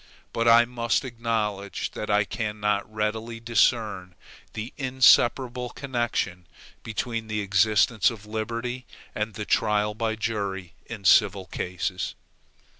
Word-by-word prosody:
But 115 0 0
I 115 +1 +7
must 120 +1 -1
acknowledge 110 -5 -2
that 105 - -6
I 105 0 +4
cannot 105 -1 -2
readily 110 +2 -3
discern 110 -6 +1 0.4
the 110 +4 -6
inseparable 125 -1 +3
connection 120 -10 -3 0.3
between 115 0 -4
the 110 -1 -2
existence 105 +2 +3
of 110 -3 -9
liberty, 115 +3 -4 0.3
and 105 0 -3
the 105 -2 -4
trial 105 -1 +1
by 110 0 -1
jury 100 -5 -3
in 105 -4 -8
civil 100 -2 +5
cases. 90 +1 -3
110 Hz, 115 wpm, -26 LUFS, 105-115 Hz, 0.4 s, I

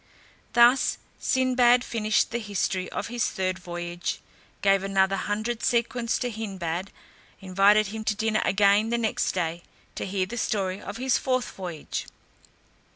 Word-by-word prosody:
Thus 240 +2 +5 0.2
Sinbad 250 -1 +3
finished 215 -2 0
the 235 - -1
history 195 -3 -2
of - - -3
his 240 -1 0
third 185 -1 -2
voyage; 175 0 -4 0.4
gave 195 -1 +4
another 195 0 +2
hundred 215 +4 -2
sequins 235 0 0
to 245 -1 -2
Hindbad, 190 -4 -4 0.5
invited 195 +3 +4
him 220 +1 -5
to 210 - +1
dinner 220 0 0
again 205 +2 +3
the 235 - +1
next 225 -2 0
day, 170 -2 -2 0.3
to - - -4
hear 190 -1 0
the 235 +6 -7
story 195 -4 -1
of 205 - -7
his 260 +1 +1
fourth 255 -3 -1
voyage. 175 -5 -6
205 Hz, 145 wpm, -26 LUFS, 190-235 Hz, 0.5 s, Thus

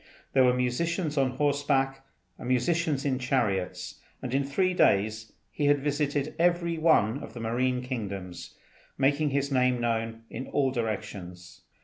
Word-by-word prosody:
There 130 - +5
were 125 -1 +5
musicians 155 +6 -1
on 135 -2 +2
horseback 140 -2 +1 0.4
and 120 - -7
musicians 150 +2 +1
in 130 -2 0
chariots, 115 -8 -1 0.2
and 125 - -5
in 140 +1 +2
three 185 +7 +1
days 110 - +2 0.2
he 145 - 0
had 145 0 +5
visited 145 0 -1
every 170 -1 +2
one 140 -6 +3
of 110 - -10
the - - -6
marine 125 +2 0
kingdoms, 100 -8 -6 0.4
making 145 +3 +2
his 140 0 -1
name 125 -2 +2
known 115 -1 -2
in 130 - -6
all 135 -2 +1
directions. 95 -6 -5
130 Hz, 145 wpm, -28 LUFS, 115-145 Hz, 0.4 s, There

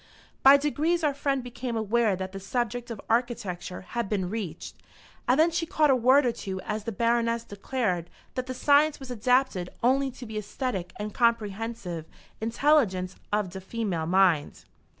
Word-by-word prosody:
By 275 +1 +9
degrees 310 +4 0
our 295 -2 +2
friend 275 -2 -1
became 245 -1 -4
aware 220 -1 +2
that 190 0 -5
the 195 - -6
subject 240 +4 -2
of 230 -3 -6
architecture 225 -7 -1
had 235 +2 -4
been 190 -4 -1
reached, 190 -7 -5 0.5
and 255 +4 +3
then 330 +2 +5
she 330 0 -1
caught 305 -3 +3
a - - +5
word 255 +3 +5
or 240 - +3
two 190 -4 -5
as 210 +1 -4
the 230 - -2
Baroness 230 +1 +1
declared 200 -5 -2 0.2
that 255 0 -3
the 255 - -4
science 290 +3 +4
was 265 -2 -8
"adaapted 245 -5 +1
only 270 +3 +3
to 250 -1 -10
de 215 -1 -4
æstetic 205 -4 -3
and 210 0 -5
comprehensive 220 -7 -1 0.3
intelligence 225 -6 +2 0.2
of 205 -3 0
de 190 - -6
famale 190 -6 -2
mind." 180 -5 +2
230 Hz, 170 wpm, -27 LUFS, 195-255 Hz, 0.5 s, By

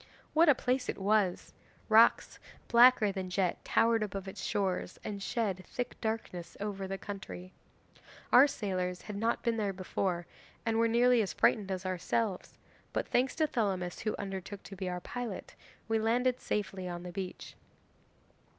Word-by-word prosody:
What 325 +1 +6
a 285 - +7
place 250 +1 -1
it - - -2
was! 200 -2 +1 0.3
Rocks 225 +1 +5 0.3
blacker 240 -3 +6
than 190 -2 -4
jet 185 -1 0
towered 230 -1 +3
above 195 -2 -4
its 190 +1 -7
shores 190 -2 -1
and 200 -1 -5
shed 195 -4 -1
thick 245 0 -4
darkness 220 -6 -4
over 200 -2 -3
the 195 0 -3
country. 190 -2 -8 0.8
Our 260 +4 +9
sailors 185 -8 -3
had 210 - -7
not 225 +3 0
been 235 -1 +1
there 205 -3 -1
before 185 -1 -2 0.4
and 225 0 +1
were 230 - +4
nearly 240 +1 +4
as 200 - -2
frightened 205 -4 +2
as 190 0 -3
ourselves, 185 +2 -2 0.4
but - - -2
thanks 255 +2 +2
to 315 - +2
Thelamis, 195 - -1
who 215 - -2
undertook 195 0 -6
to 195 - -9
be 185 -1 -3
our 180 0 -4
pilot, 240 -2 -6 0.3
we 225 0 +1
landed 245 +3 +1
safely 195 -3 -3
on 175 0 -5
the 180 - -6
beach. 185 0 -6
205 Hz, 160 wpm, -31 LUFS, 185-230 Hz, 0.8 s, Our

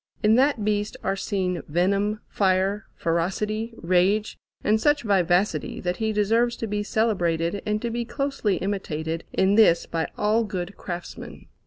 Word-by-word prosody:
In 215 +1 +5
that 255 -3 +3
beast 210 0 -1
are - - 0
seen 185 -3 -2
venom, 200 +6 +1
fire, 195 +1 +1
ferocity, 210 +7 -1
rage, 185 +5 +1 0.3
and 215 +1 +2
such 295 +1 +3
vivacity, 180 -5 +1
that 180 0 -2
he 220 -1 0
deserves 225 +3 +2
to - - -4
be 210 -1 -2
celebrated 185 -5 0
and 210 0 +1
to 235 - -1
be 235 +1 -2
closely 275 -5 -1
imitated 165 -5 -3
in 190 +1 +2
this 205 -6 +5
by 165 -1 -2
all 215 +2 +2
good 190 -2 -5
craftsmen. 175 -1 -8
205 Hz, 150 wpm, -25 LUFS, 180-220 Hz, 0.3 s, In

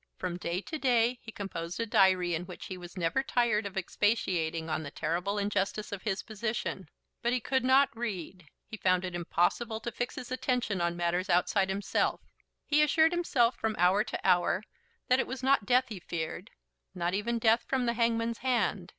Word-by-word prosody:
From 180 -1 -3
day 175 +1 -2
to 315 +8 -6
day 245 -2 +2
he 220 - -9
composed 180 -4 -5
a 230 - 0
diary 185 -4 +3
in 170 +2 -3
which 180 - -9
he 190 - -6
was 180 0 -11
never 170 +9 +1
tired 235 -5 +1
of 195 0 -9
expatiating 175 -5 0
on 155 -1 -1
the 150 - -6
terrible 175 +7 -2
injustice 205 +1 -1
of 200 -2 -5
his 200 -1 -2
position. 220 -5 -4 0.3
But 240 +1 +1
he 255 - +1
could 260 +2 0
not 265 0 +4
read. 190 -7 -5 0.2
He 220 - -8
found 185 -2 +2
it - - -2
to - - -13
be - - -7
impossible 175 +6 0
to 235 - -4
fix 245 +2 -3
his 250 - -7
attention 250 -7 -1
on 170 0 0
matters 175 +2 0
outside 190 +2 +2
himself. 195 +1 0 0.5
He 300 0 +3
assured 315 +2 +4
himself 275 -9 +2
from 220 -1 -1
hour 185 +4 +4
to 220 - -4
hour 180 +2 +3 0.4
that 255 +1 +4
it - - 0
was 260 0 -6
not 265 -6 +3
death 250 +2 +3
he 210 -4 -6
feared, 160 -2 -5 0.5
not 175 0 -1
even 230 +4 0
death 230 +1 +4
from 260 -2 0
the 235 - +1
hangman's 230 0 0
hand. 220 -8 0
210 Hz, 200 wpm, -30 LUFS, 180-240 Hz, 0.5 s, not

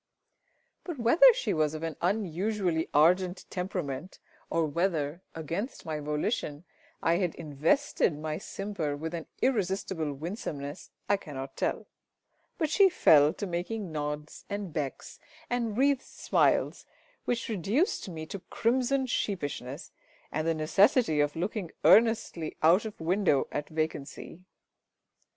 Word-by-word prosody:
But 345 -5 -5
whether 290 - +7
she - - -1
was 155 -1 +1
of 155 - -6
an 165 -2 -3
unusually 185 -2 0
ardent 180 +5 +3
temperament, 180 -3 -4 0.3
or 165 -1 +1
whether, 160 0 -1
against 170 - -4
my 155 -2 -3
volition, 150 +1 -2 0.4
I 165 +1 +3
had 180 -3 -1
invested 160 - +1
my 155 0 -3
simper 185 -8 -4
with 160 +3 -5
an 165 -2 -5 0.2
irresistible 190 - 0
winsomeness, 145 -2 -6 0.2
I 205 - +3
cannot 135 -7 -7
tell; - - -1 0.7
but 315 -6 0
she 390 +3 +6
fell 150 - +6
to 205 - -4
making 185 +2 -3
nods 150 0 -4
and 200 -5 -4
becks 145 -4 -4 0.3
and 230 -3 -1
wreathed 275 0 +3
smiles - - +1 0.4
which 240 -1 -1
reduced 220 - 0
me 160 -2 -6
to 195 +5 -6
crimsoned 255 +2 +1
sheepishness, 145 - -3 0.4
and 155 +2 -1
the 165 - +2
necessity 180 - +3
of 145 0 +1
looking 185 +1 -3
earnestly 220 -8 +4
out 175 +7 +5
of 215 - -7
window 170 -3 +2
at 145 0 -3
vacancy. 155 0 -4
170 Hz, 130 wpm, -29 LUFS, 155-210 Hz, 0.7 s, whether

